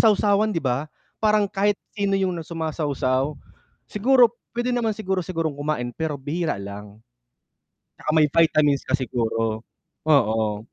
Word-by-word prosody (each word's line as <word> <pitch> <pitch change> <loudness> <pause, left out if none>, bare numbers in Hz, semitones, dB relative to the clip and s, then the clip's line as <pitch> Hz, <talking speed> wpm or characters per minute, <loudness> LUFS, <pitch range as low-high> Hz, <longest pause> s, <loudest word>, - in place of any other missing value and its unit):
sawsawan 210 -1 +4
'di 165 -8 -2
ba, 130 +4 -1 0.3
parang 215 -1 +3
kahit 200 +1 +1 0.2
sino 200 -2 0
'yung 190 -2 0
'no, 170 - -4
sumasawsaw. 150 -4 -1 0.5
Siguro, 240 +2 +4 0.2
puwede 245 +1 0
naman 225 -3 0
siguro 190 -3 -1
sigurong 165 -3 -2
kumain 135 -5 -2
pero 160 -1 -3
bihira 150 - -2
lang. 100 +1 -8 1.0
'Tsaka - - -4
may 155 -1 +5
vitamins 150 -2 +3
ka 135 +2 0
siguro, 115 -3 -1 0.5
oo. 110 -5 +2
155 Hz, 135 wpm, -23 LUFS, 130-200 Hz, 1.0 s, may